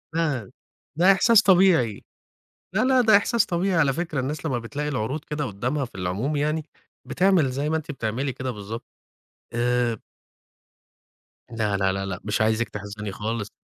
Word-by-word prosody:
ده 145 Hz, -, -1 dB, 0.4 s
ده 180 Hz, +4 st, +6 dB
إحساس 215 Hz, +2 st, +5 dB
طبيعي، 180 Hz, -, +4 dB, 0.7 s
لا، 220 Hz, -, +3 dB
لا، 260 Hz, -1 st, +4 dB
ده 220 Hz, -3 st, +6 dB
إحساس 230 Hz, +1 st, +1 dB
طبيعي 180 Hz, +1 st, 0 dB
على 145 Hz, -5 st, +3 dB
فكرة، 165 Hz, -3 st, -3 dB
الناس 145 Hz, +4 st, -3 dB
لمّا 125 Hz, -5 st, 0 dB
بتلاقي 145 Hz, +6 st, -4 dB
العروض 130 Hz, +3 st, -2 dB
كده 150 Hz, -1 st, -3 dB
قدّامها 125 Hz, +8 st, -2 dB
في 120 Hz, -, -16 dB
العموم 95 Hz, +11 st, -2 dB
يعني، 150 Hz, +2 st, -1 dB, 0.4 s
بتعمل 180 Hz, -7 st, +3 dB
زي 140 Hz, +3 st, -2 dB
ما 160 Hz, -, +1 dB
أنتِ 155 Hz, -1 st, -6 dB
بتعملي 125 Hz, +2 st, -2 dB
كده 130 Hz, 0 st, -4 dB
بالضبط، 105 Hz, +1 st, -7 dB, 0.7 s
آآ 120 Hz, -1 st, +1 dB, 1.5 s
لا، 105 Hz, -3 st, -1 dB
لا، 95 Hz, -1 st, +2 dB
لا، 95 Hz, 0 st, -3 dB
لأ 95 Hz, -2 st, -4 dB
مش 110 Hz, +1 st, -1 dB
عايزِك 110 Hz, +1 st, +1 dB
تحزني 105 Hz, 0 st, -6 dB
خالص. 105 Hz, 0 st, -4 dB
135 Hz, 160 wpm, -24 LUFS, 110-160 Hz, 1.5 s, ده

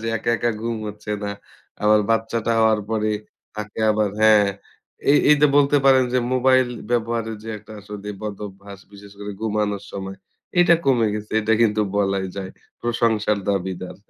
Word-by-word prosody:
যে 115 Hz, -, -5 dB
একা, 115 Hz, +1 st, -2 dB
একা 120 Hz, -, 0 dB
ঘুম 115 Hz, 0 st, -2 dB
হচ্ছে 105 Hz, 0 st, -8 dB
না। 100 Hz, -, -2 dB, 0.5 s
আবার 105 Hz, 0 st, +5 dB
বাচ্চাটা 115 Hz, +1 st, 0 dB
হওয়ার 110 Hz, -1 st, +3 dB
পরে 110 Hz, -1 st, 0 dB, 0.5 s
থাকে 105 Hz, +1 st, -6 dB
আবার 105 Hz, -1 st, +1 dB
হ্যাঁ, 110 Hz, -2 st, +6 dB, 0.6 s
এ -, -, +7 dB, 0.2 s
এই 150 Hz, -, +7 dB
যে 150 Hz, -, +7 dB
বলতে 145 Hz, 0 st, +4 dB
পারেন 130 Hz, -1 st, +6 dB
যে 130 Hz, -, +3 dB
মোবাইল 130 Hz, 0 st, +3 dB, 0.2 s
ব্যবহারের 115 Hz, -2 st, -1 dB
যে -, -, -7 dB
একটা 105 Hz, +1 st, -14 dB
আসলে 105 Hz, 0 st, -8 dB
বদভ্যাস 100 Hz, -1 st, -8 dB
বিশেষ 100 Hz, 0 st, -13 dB
করে 105 Hz, 0 st, -6 dB
ঘুমানোর 105 Hz, -2 st, -1 dB
সময় 95 Hz, 0 st, -6 dB, 0.4 s
এইটা 175 Hz, -1 st, +6 dB
কমে 120 Hz, -5 st, +3 dB
গেছে। 105 Hz, 0 st, -6 dB
এইটা 110 Hz, +1 st, +1 dB
কিন্তু 105 Hz, -1 st, +2 dB, 0.2 s
বলাই 95 Hz, -1 st, 0 dB
যায়। 95 Hz, -1 st, -5 dB, 0.3 s
প্রশংসার 115 Hz, -3 st, +1 dB
দাবীদার। 95 Hz, -2 st, -3 dB
105 Hz, 160 wpm, -22 LUFS, 100-115 Hz, 0.6 s, এ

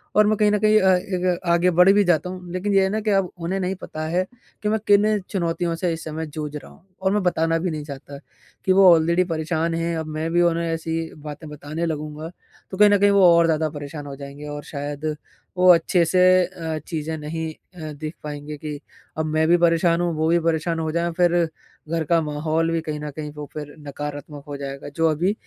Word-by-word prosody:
और 210 Hz, 0 st, +5 dB
मैं 215 Hz, -, +3 dB
कहीं 210 Hz, 0 st, +3 dB
न 210 Hz, -, +3 dB
कहीं 215 Hz, +1 st, +5 dB
अ, 190 Hz, -1 st, +5 dB
एक 180 Hz, -1 st, -1 dB
आगे 175 Hz, +1 st, +3 dB
बढ़ 180 Hz, +3 st, +6 dB
भी 205 Hz, 0 st, +4 dB
जाता 175 Hz, -1 st, +1 dB
हूँ, 180 Hz, -1 st, -8 dB
लेकिन 195 Hz, +3 st, -1 dB
ये 195 Hz, -1 st, +5 dB
है 190 Hz, -, +1 dB
ना 215 Hz, +2 st, -1 dB
कि 215 Hz, 0 st, 0 dB
अब 195 Hz, -2 st, +1 dB
उन्हें 175 Hz, +3 st, -2 dB
नहीं 185 Hz, 0 st, -1 dB
पता 155 Hz, -, -6 dB
है 175 Hz, +3 st, +1 dB, 0.4 s
कि 210 Hz, -, +1 dB
मैं 220 Hz, +1 st, +1 dB
किन 210 Hz, +1 st, +4 dB
चुनौतियों 170 Hz, -3 st, -1 dB
से 175 Hz, +1 st, -1 dB
इस 160 Hz, -, -6 dB
समय 160 Hz, +1 st, -4 dB
जूझ 150 Hz, 0 st, -6 dB
रहा 150 Hz, -, -8 dB
हूँ 175 Hz, -, -20 dB, 0.2 s
और 190 Hz, -, +2 dB
मैं 210 Hz, -, +2 dB
बताना 165 Hz, -2 st, +1 dB
भी 180 Hz, +2 st, -1 dB
नहीं 155 Hz, -1 st, -4 dB
चाहता 140 Hz, -1 st, -9 dB, 0.5 s
कि 190 Hz, -, +3 dB
वो 190 Hz, -1 st, +7 dB
ऑलरेडी 170 Hz, +2 st, +3 dB
परेशान 160 Hz, +1 st, -1 dB
हैं, 165 Hz, 0 st, -1 dB
अब 160 Hz, -, -3 dB
मैं 155 Hz, +1 st, -3 dB
भी 175 Hz, -, +4 dB
उन्हें 170 Hz, -1 st, +2 dB
ऐसी 165 Hz, 0 st, -2 dB, 0.2 s
बातें 150 Hz, +1 st, -8 dB
बताने 150 Hz, +3 st, -5 dB
लगूँगा, 155 Hz, 0 st, -4 dB, 0.4 s
तो 190 Hz, -, -5 dB
कहीं 210 Hz, +1 st, +7 dB
न 205 Hz, -, +5 dB
कहीं 205 Hz, +1 st, +5 dB
वो 200 Hz, -2 st, +5 dB
और 170 Hz, -, +5 dB
ज़्यादा 160 Hz, -1 st, +1 dB
परेशान 145 Hz, 0 st, -7 dB
हो 140 Hz, -, -7 dB
जाएँगे 140 Hz, +1 st, -9 dB
और 145 Hz, 0 st, -6 dB
शायद 145 Hz, +1 st, -4 dB, 0.4 s
वो 180 Hz, 0 st, +4 dB
अच्छे 170 Hz, +1 st, +2 dB
से 180 Hz, +3 st, +1 dB, 0.3 s
अ, 165 Hz, -3 st, -5 dB
चीज़ें 160 Hz, -1 st, -3 dB
नहीं 160 Hz, +1 st, -4 dB
अ, 155 Hz, -2 st, -10 dB
देख 155 Hz, +2 st, -6 dB
पाएँगे 150 Hz, 0 st, -6 dB
कि 150 Hz, -1 st, -6 dB, 0.4 s
अब 160 Hz, -, 0 dB
मैं 155 Hz, +1 st, +1 dB
भी 175 Hz, +1 st, +5 dB
परेशान 170 Hz, 0 st, +3 dB
हूँ, 175 Hz, -1 st, 0 dB
वो 155 Hz, +1 st, 0 dB
भी 170 Hz, +1 st, +4 dB
परेशान 165 Hz, 0 st, 0 dB
हो 160 Hz, -1 st, -2 dB
जाएँ 170 Hz, +1 st, 0 dB
फिर 175 Hz, -1 st, +3 dB, 0.6 s
घर 165 Hz, 0 st, 0 dB
का 170 Hz, -1 st, +4 dB
माहौल 155 Hz, +2 st, -1 dB
भी 165 Hz, 0 st, 0 dB
कहीं 155 Hz, -1 st, -4 dB
न 150 Hz, 0 st, -5 dB
कहीं 150 Hz, -1 st, -5 dB
वो 150 Hz, 0 st, -7 dB
फिर 150 Hz, -1 st, -7 dB
नकारात्मक 145 Hz, 0 st, -6 dB
हो 145 Hz, -, -5 dB
जाएगा 140 Hz, 0 st, -6 dB
जो 165 Hz, 0 st, +3 dB
अभी 175 Hz, +6 st, +1 dB
165 Hz, 230 wpm, -23 LUFS, 155-180 Hz, 0.6 s, वो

